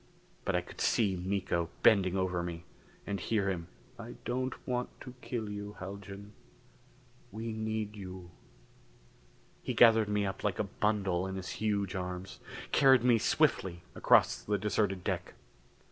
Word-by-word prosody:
But - - +1
I - - +2
could - - -10
see 100 -5 +2
Miko 90 -2 -1
bending 95 -3 +5
over 90 -2 0
me, 85 -1 -5 0.4
and 100 -1 -2
hear 100 +1 0
him: 85 -3 -4 0.3
"I 115 +1 -8
don't 130 +1 -1
want 125 -1 -1
to 125 - -9
kill 115 -4 -3
you, 105 0 -6
Haljan. 100 +2 -8 1.0
We 110 +2 -4
need 110 -1 -3
you." 95 -3 -9 1.3
He - - -3
gathered 115 -2 +6
me 105 -1 +1
up 95 -1 -4
like 100 -4 0
a - - +1
bundle 100 -3 0
in 95 - -4
his 95 -1 -5
huge 100 -3 -1
arms; 90 0 -5 0.3
carried 130 -3 +6
me 120 -2 +5
swiftly 85 -3 +1
across - - +4
the 105 0 0
deserted 100 -2 0
deck. - - -3
100 Hz, 145 wpm, -32 LUFS, 95-110 Hz, 1.3 s, gathered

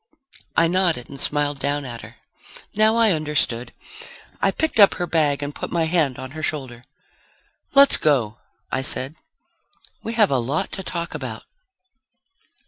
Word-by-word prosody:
I 165 - +5
nodded 170 -7 0
and 135 - -8
smiled 145 -1 0
down 145 +1 -1
at 120 -2 -7
her. - - -12 0.6
Now 215 +1 +4
I 230 -2 +4
understood. 150 -7 0 0.7
I - - +4
picked 315 -7 -1
up 200 - +7
her 175 - -2
bag 150 -4 +1
and 145 +1 -4
put - - -6
my 170 -1 +1
hand 160 -6 +1
on 130 0 -7
her 155 +2 -7
shoulder. 130 -6 -3 0.9
"Let's 280 0 +8
go," 120 -8 +1 0.3
I - - 0
said. 135 +1 -2 0.9
"We 225 - -5
have 215 -6 +3
a 135 - +2
lot 140 +10 -2
to 195 - -4
talk 170 -2 -4
about." - - -6
150 Hz, 155 wpm, -22 LUFS, 135-175 Hz, 0.9 s, Let's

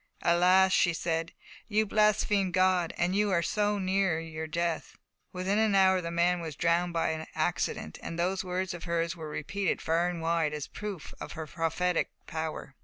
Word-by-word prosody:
"Alas!" 185 +2 +5
she 175 - +4
said, 165 0 -2 0.4
"you 215 0 +2
blaspheme 210 -2 +2
God, 185 -1 +2
and 175 +2 +1
you 205 0 +2
are 170 -3 +2
so 210 +1 +1
near 190 -3 +1
your 160 -1 -6
death!" 170 +1 -2 0.3
Within 190 +3 0
an 220 -2 +3
hour 190 -1 +5
the 170 - -4
man 175 +1 +2
was 160 -3 -6
drowned 170 +3 +1
by 160 -1 -1
accident, 80 - -2
and 165 - -6
those 185 +2 0
words 185 0 -2
of 175 -1 -8
hers 170 0 -1
were 160 -2 -7
repeated 185 +6 -2
far 170 +2 +1
and 175 -1 -4
wide 165 -2 0
as 150 - -4
a - - -20
proof 205 -6 -6
of - - -6
her 160 -1 -5
prophetic 165 +3 0 0.2
power. 160 -3 -5
175 Hz, 180 wpm, -29 LUFS, 165-190 Hz, 0.4 s, Alas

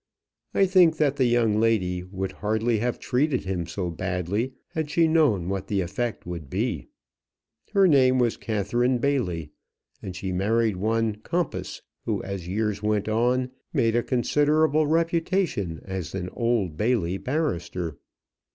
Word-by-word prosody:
I 195 - +5
think 180 -4 +5
that 145 -2 +1
the 130 - +3
young 115 -3 +2
lady 95 -6 +1
would 95 +1 -4
hardly 110 +2 0
have 120 +2 -1
treated 130 +1 0
him 90 -3 -2
so 90 0 -3
badly 95 +8 -2 0.2
had 160 -2 -3
she 165 +2 +3
known 145 - +3
what 95 -1 -3
the 100 -2 0
effect 115 +6 -3
would 85 -5 -6
be. - - -2 0.9
Her 195 -1 +5
name 130 -5 +5
was 120 -3 +2
Catherine 120 +4 0
Bailey, 95 - -1 0.5
and 95 -2 -6
she 95 +1 -4
married 105 +2 +1
one 110 +1 0
Compas, 170 +11 -3 0.2
who, - - -1
as 95 -3 -5
years 105 +1 -1
went 105 -1 0
on, 125 +3 +1 0.2
made 115 -1 +2
a 120 - +3
considerable 150 +5 +2
reputation 165 - 0
as 95 -2 -5
an 90 -1 -3
Old 115 -9 0
Bailey 105 -6 0
barrister. 90 - -2
110 Hz, 145 wpm, -25 LUFS, 95-130 Hz, 0.9 s, I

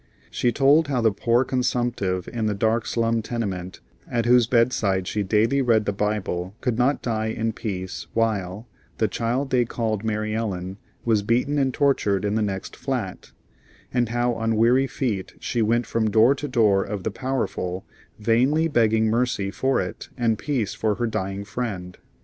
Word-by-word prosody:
She 120 - +1
told 145 +5 +4
how 135 -3 0
the 110 -1 +4
poor 115 +5 +2
consumptive 120 -8 -1
in 115 -2 -2
the 105 - 0
dark 110 +3 +1
slum 115 -1 +1
tenement, 100 -6 -4 0.3
at 120 -1 0
whose 120 -1 +5
bedside 115 -6 +2
she 105 - -1
daily 110 +7 +2
read 115 -4 +3
the 100 - 0
Bible, 100 -2 -2
could 125 -3 -1
not 125 +4 +1
die 110 -2 -1
in 110 0 -2
peace 95 -4 -5
while 105 -1 -1 0.3
"the - - +2
child 125 +4 -2
they 125 -1 +4
called 110 -3 -2
Mary 110 -1 -1
Ellen" 95 -4 -3 0.3
was 110 -3 +3
beaten 125 +7 +1
and 135 -1 +2
tortured 105 -8 +1
in 100 - 0
the 110 - +1
next 95 -2 -3
flat; - - -4 0.6
and 120 -2 +1
how 120 +1 +1
on 115 0 -1
weary 125 +5 +4
feet 110 -9 -3
she 120 - -1
went 115 +2 +2
from 110 -1 0
door 115 +5 +5
to 145 +1 -5
door 105 -7 +3
of 100 -2 -5
the 110 - -1
powerful, 100 -7 -3 0.3
vainly 130 +9 +2
begging 110 -6 +3
mercy 110 -3 0
for 135 +5 +1
it - - -5
and 115 -3 +1
peace 130 -9 -1
for 110 -2 0
her 120 - -1
dying 100 -3 -3
friend. 100 -6 -5
115 Hz, 175 wpm, -24 LUFS, 105-125 Hz, 0.6 s, whose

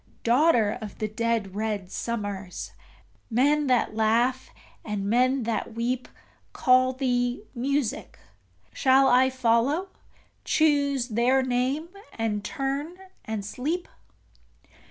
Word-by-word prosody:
Daughter 235 -4 +3
of 210 -2 -8
the 215 - -2
dead 220 -2 -1
red 210 -3 -3
summers! 205 -5 -4 0.6
Men 285 +5 +2
that 250 -4 +2
laugh 235 +4 +1 0.3
and 210 -2 -3
men 255 +4 +2
that 225 0 -3
weep 245 +2 -2 0.5
Call 255 0 +4
thee 245 -3 -1
Music 270 0 -2 0.6
shall 265 - +4
I 255 +1 +5
follow, 260 +8 +1 0.5
choose 280 -5 +2
their 245 +4 +2
name, 260 +6 -1 0.2
and 215 -2 -2
turn 275 - -3 0.3
and 215 -2 -4
sleep? 300 - -3
245 Hz, 105 wpm, -26 LUFS, 220-270 Hz, 0.6 s, I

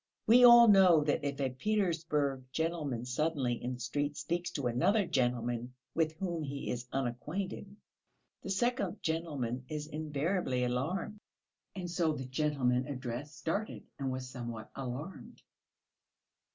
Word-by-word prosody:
We 240 +3 +7
all 240 -1 +10
know 185 -6 +7
that 145 -1 0
if 140 -1 -2
a 135 -2 0
Petersburg 155 -5 0
gentleman 150 -7 -2
suddenly 130 -2 -1
in 125 +1 -2
the - - -12
street 145 +4 -2
speaks 170 +4 -2
to 140 - -3
another 160 - +2
gentleman 120 -4 -1 0.2
with 160 -1 +1
whom 170 -1 -3
he 140 -1 -4
is 125 0 -4
unacquainted, 150 +11 -3 0.7
the - - -7
second 200 -1 0
gentleman 145 -7 -2
is 150 -1 -3
invariably 150 -2 -1
alarmed. 150 +12 -2 0.6
And 180 -2 -4
so 170 -2 +1
the 135 -3 -5
gentleman 130 -2 0
addressed 135 +2 -5
started 200 +6 -3 0.2
and 135 -1 -1
was 130 0 -4
somewhat 120 -4 -7
alarmed. 135 +7 -6
145 Hz, 135 wpm, -32 LUFS, 125-170 Hz, 0.7 s, all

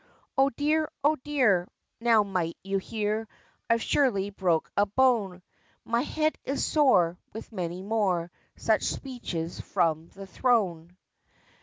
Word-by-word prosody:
"O 270 +1 +4
dear! 300 +4 0
O 300 +2 +4
dear!" 250 -11 +2 0.3
now 230 -2 +4
might 180 -4 -2
you 195 0 -1
hear, 215 +2 -2 0.4
"I've 230 0 +2
surely 205 -9 +1
broke 180 -5 0
a 205 0 +3
bone"; 205 -6 +2 0.4
"My 235 +1 +1
head 310 +2 -1
is 275 +1 -1
sore," 180 - +3
with 220 - -8
many 180 -2 -4
more 190 -5 0 0.2
Such - - +1
speeches 185 -11 -4
from 160 -1 0
the 195 +2 -11
thrown. 185 -6 0
205 Hz, 130 wpm, -27 LUFS, 180-255 Hz, 0.4 s, O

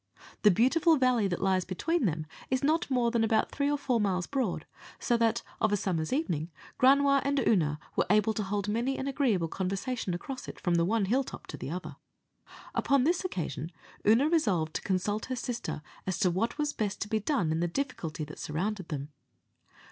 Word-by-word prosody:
The 210 - +7
beautiful 295 - +4
valley 250 -5 +3
that 175 -1 -2
lies 190 -1 +2
between 235 - 0
them 155 -2 -2 0.2
is 260 +1 0
not 315 +3 +2
more 245 -3 +2
than 230 -1 +2
about 220 0 +2
three 280 0 0
or 290 - +1
four 250 -5 0
miles 185 -3 0
broad, 260 -9 -2 0.3
so 240 - +1
that 230 0 +1 0.2
of 215 - +2
a 205 - +3
summer's 165 -5 -1
evening, 175 - -1 0.3
Granua 275 +1 +5
and 280 +1 0
Oonagh 165 - +2 0.2
were - - +1
able 210 +2 +4
to 215 - -2
hold 200 0 -2
many 235 +6 0
an 265 - -3
agreeable 245 - +1
conversation 195 +3 -2
across 255 +8 -6
it, - - -8
from 175 - 0
the 170 0 +3
one 215 +2 +1
hill 250 +8 +2
top - - -9
to - - -7
the - - -6
other. 180 +4 -6 0.8
Upon 275 -2 +2
this 340 +6 +2
occasion 160 - -4 0.3
Oonagh 245 +9 +4
resolved 185 - +1
to - - -8
consult 200 +3 -1
her 255 - -2
sister 240 -10 -4 0.2
as 190 - -1
to 185 -4 +4
what 225 +9 -1
was 295 -1 0
best 205 -2 -2
to 215 - -1
be 220 +1 0
done 210 - 0
in 160 - 0
the 175 - +1
difficulty 170 - -3
that 150 0 -9
surrounded 185 +4 -3
them. 145 -2 -4
215 Hz, 200 wpm, -30 LUFS, 180-265 Hz, 0.8 s, The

